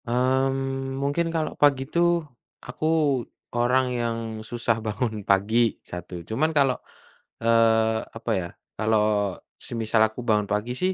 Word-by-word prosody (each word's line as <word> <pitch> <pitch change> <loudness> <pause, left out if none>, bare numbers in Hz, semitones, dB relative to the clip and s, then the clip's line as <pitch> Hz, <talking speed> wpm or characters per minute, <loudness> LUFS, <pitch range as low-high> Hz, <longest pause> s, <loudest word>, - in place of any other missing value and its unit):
Mmm, 135 +2 0
mungkin 145 +5 0
kalau 160 -2 -2
pagi 140 -2 +4
tuh, 170 +2 +2 0.4
aku 125 +5 -5 0.7
orang 125 +2 +2 0.2
yang 115 -1 -1 0.3
susah 115 -1 0
bangun 110 0 -2
pagi, 110 +4 +3
satu. 90 -1 -8
Cuman 150 +9 +1
kalau, 135 -2 +4 0.7
eee, 110 -1 +4 0.2
apa 115 0 -3
ya, 85 -1 -5 0.3
kalau 105 -3 +1 0.3
semisal 115 -1 0
aku 110 +3 -11
bangun 105 -2 +2
pagi 105 +4 -1
sih 185 +1 +2
120 Hz, 125 wpm, -25 LUFS, 110-135 Hz, 0.7 s, pagi